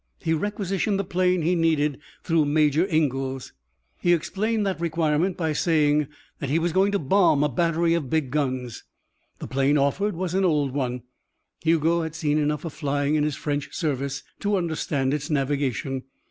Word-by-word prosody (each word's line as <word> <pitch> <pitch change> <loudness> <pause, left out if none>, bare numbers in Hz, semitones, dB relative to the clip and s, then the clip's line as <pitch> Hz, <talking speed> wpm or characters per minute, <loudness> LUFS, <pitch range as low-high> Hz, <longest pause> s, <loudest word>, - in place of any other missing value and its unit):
He 160 - -1
requisitioned 200 +2 -1
the 200 - 0
plane 180 -1 +1
he 175 +3 +2
needed 155 -4 +1 0.2
through 165 -3 +2
Major 150 +3 +2
Ingalls. 135 -5 -1 0.5
He 175 - +3
explained 205 +6 0
that 190 -3 -2
requirement 165 +2 0
by 160 -3 0
saying 150 -3 +2 0.3
that 140 - -3
he 150 - +2
was 170 +1 0
going 195 +2 +3
to - - +3
bomb 155 -2 +3
a 150 - +2
battery 165 +4 +1
of 160 -6 -1
big 150 -4 0
guns. 130 -5 -2 0.5
The - - -7
plane 135 +2 +2
offered 180 +9 +1
was 180 0 -3
an 190 +1 +2
old 150 -6 +2
one. 125 -3 -2 0.6
Hugo 165 +1 +2
had 160 -1 -5
seen 155 -2 +1
enough 150 +2 -1
of 165 - -5
flying 145 -1 -1
in 150 -1 +2
his 150 -2 -1
French 145 -1 -3
service 140 -4 -2 0.2
to 205 0 0
understand 155 -6 -1
its 150 +2 -3
navigation. 135 -3 -1
155 Hz, 175 wpm, -24 LUFS, 145-175 Hz, 0.6 s, He